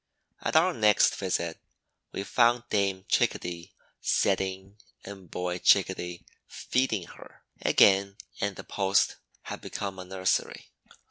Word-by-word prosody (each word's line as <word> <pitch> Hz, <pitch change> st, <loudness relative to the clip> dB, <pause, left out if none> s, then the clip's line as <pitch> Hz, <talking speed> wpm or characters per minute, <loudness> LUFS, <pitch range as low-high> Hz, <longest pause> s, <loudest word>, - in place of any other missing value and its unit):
At -, -, -2 dB
our 175 Hz, +3 st, +5 dB
next 105 Hz, -5 st, +4 dB
visit 85 Hz, -3 st, -2 dB, 0.5 s
we 100 Hz, -, -4 dB
found 120 Hz, +3 st, +3 dB
Dame 100 Hz, -2 st, 0 dB
Chickadee 85 Hz, +1 st, -1 dB, 0.3 s
setting 95 Hz, +1 st, -1 dB, 0.3 s
and 95 Hz, -3 st, -10 dB
Boy 90 Hz, 0 st, -3 dB
Chickadee 90 Hz, -3 st, +2 dB, 0.2 s
feeding 125 Hz, -7 st, -1 dB
her; -, -, -15 dB, 0.2 s
again, 100 Hz, 0 st, +4 dB, 0.2 s
and 100 Hz, -1 st, -1 dB
the -, -, -9 dB
post 100 Hz, 0 st, +1 dB, 0.3 s
had -, -, -7 dB
become 95 Hz, -2 st, -5 dB
a 90 Hz, -, -7 dB
nursery. 95 Hz, 0 st, -2 dB
95 Hz, 120 wpm, -28 LUFS, 95-100 Hz, 0.5 s, our